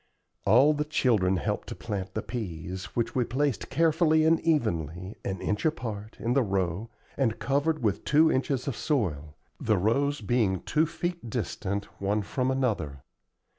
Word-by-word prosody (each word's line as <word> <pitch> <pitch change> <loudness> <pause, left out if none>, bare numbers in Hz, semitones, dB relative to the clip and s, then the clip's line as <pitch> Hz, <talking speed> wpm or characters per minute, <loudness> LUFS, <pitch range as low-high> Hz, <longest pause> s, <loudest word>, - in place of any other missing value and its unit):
All 130 +9 +6
the 150 0 0
children 110 -11 +2
helped - - -2
to - - -5
plant 95 -4 -5
the - - -2
peas, 95 -5 -5
which 120 0 0
we 125 - +2
placed 135 +2 -1
carefully 160 +1 +3
and 165 +1 +4
evenly, 95 - -1
an 95 -1 -3
inch 105 +1 -1
apart, 110 -9 -3
in 120 +2 0
the 135 - +4
row, 95 0 -1 0.3
and 120 -5 +1
covered 145 +2 0
with 105 -3 0
two 155 +2 +4
inches 130 0 0
of 135 - -1
soil, 80 - -1 0.2
the 110 -3 +2
rows 135 +8 +1
being 105 -4 +1
two 155 +2 +2
feet 175 -5 -4
distant 100 -2 -2 0.2
one 100 +2 +1
from 130 +5 -1
another. 105 - -1
115 Hz, 160 wpm, -28 LUFS, 95-145 Hz, 0.3 s, All